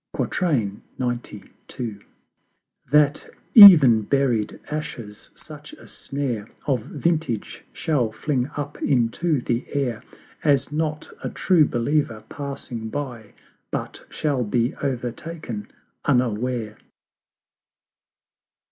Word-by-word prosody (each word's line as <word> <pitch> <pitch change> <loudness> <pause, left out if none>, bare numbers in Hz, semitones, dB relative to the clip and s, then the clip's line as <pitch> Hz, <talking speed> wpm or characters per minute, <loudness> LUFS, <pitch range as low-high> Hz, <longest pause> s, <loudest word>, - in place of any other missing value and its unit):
XCII. 120 - 0 2.1
That 150 0 +3 0.3
ev'n 155 - +10
buried 120 -2 0
Ashes 115 -9 -6
such 150 -1 -10
a - - -14
snare 125 -7 -4 0.2
Of 130 -5 +1
Vintage 150 -3 -2
shall 130 -8 0
fling 130 +3 -1
up 145 0 -5
into 135 +4 +1
the 120 0 -1
Air 130 -6 -1 0.4
As 145 -1 +2
not 155 0 -3
a - - -2
True 175 -5 +3
believer 120 -3 -1
passing 135 -5 -6
by 120 -6 -6 0.4
But - - -5
shall 140 -5 -1
be 120 +3 0
overtaken 125 -2 -4 0.4
unaware. 125 -3 0
135 Hz, 90 wpm, -23 LUFS, 115-150 Hz, 2.1 s, ev'n